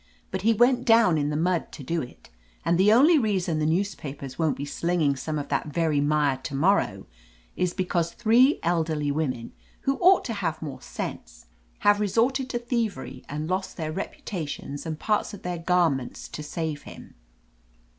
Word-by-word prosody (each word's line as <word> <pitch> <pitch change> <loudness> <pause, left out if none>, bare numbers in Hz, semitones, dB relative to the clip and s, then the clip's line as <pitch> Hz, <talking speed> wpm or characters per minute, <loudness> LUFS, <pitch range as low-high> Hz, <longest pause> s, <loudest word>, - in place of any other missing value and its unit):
But 190 - -2
he 225 +4 +4
went 245 +3 +3
down 225 -9 +5
in 145 0 0
the 150 - -2
mud 175 +1 0
to 145 - -8
do 165 +5 -1
it. 120 - -11 0.3
And 170 +1 +2
the 200 +3 +6
only 295 +8 +6
reason 185 - 0
the 155 - +1
newspapers 155 -7 -3
won't 160 -3 +1
be 140 - -4
slinging 160 -1 0
some 155 +3 -3
of 145 - -4
that 140 +1 -1
very 155 -1 +1
mire 145 -2 +2
to 130 +1 -6
morrow 140 - +2 0.5
is 180 -1 -1
because 175 -3 0
three 240 +5 +4
elderly 160 -4 0
women, 130 -6 -2 0.3
who 270 0 0
ought 370 +1 +5
to 230 - -2
have 165 -6 -2
more 150 -4 -7
sense, - - -7 0.4
have 205 0 +4
resorted 245 +6 +1
to 245 - -1
thievery 235 -3 -3
and 150 +2 -3
lost 185 +1 -2
their 155 -2 -3
repu 195 - -6
tations 150 -4 -5
and 155 -1 -3
parts 210 +3 0
of - - -15
their 180 -1 -3
garments 165 -7 0
to - - -6
save 150 -1 -4
him!" - - -12
170 Hz, 180 wpm, -26 LUFS, 150-205 Hz, 0.5 s, the